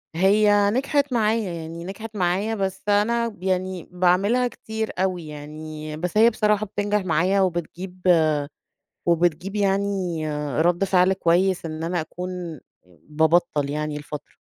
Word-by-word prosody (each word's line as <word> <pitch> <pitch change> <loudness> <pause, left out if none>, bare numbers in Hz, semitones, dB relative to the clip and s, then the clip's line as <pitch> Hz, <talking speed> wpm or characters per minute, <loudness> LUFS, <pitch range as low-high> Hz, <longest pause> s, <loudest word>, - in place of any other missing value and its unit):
هي 205 +3 +4
نجحت 280 +3 0
معايا، 220 -3 +1
يعني 165 0 -7
نجحت 215 +4 -8
معايا، 195 +4 0
بس 195 -2 -3
أنا 230 +2 +1
يعني 185 -1 -2
باعملها 185 +8 +2
كتير 220 -2 -5
أوي 185 -3 -1
يعني، 155 +1 -7
بس 180 +5 -3
هي 225 +2 +7
بصراحة 210 -2 +1
بتنجح 205 0 -1
معايا 185 +4 +2
وبتجيب 180 +1 -3 1.0
وبتجيب 175 +3 +1
يعني 195 -4 0 0.4
رد 175 +3 +2
فعل 185 -1 +3
كويس 180 0 +1
إن 155 0 -5
أنا 170 0 -1
أكون 180 -1 -6 0.5
بابطّل 160 -1 +2
يعني 150 0 -3
لفترة. 150 0 -8
185 Hz, 125 wpm, -23 LUFS, 170-205 Hz, 1.0 s, هي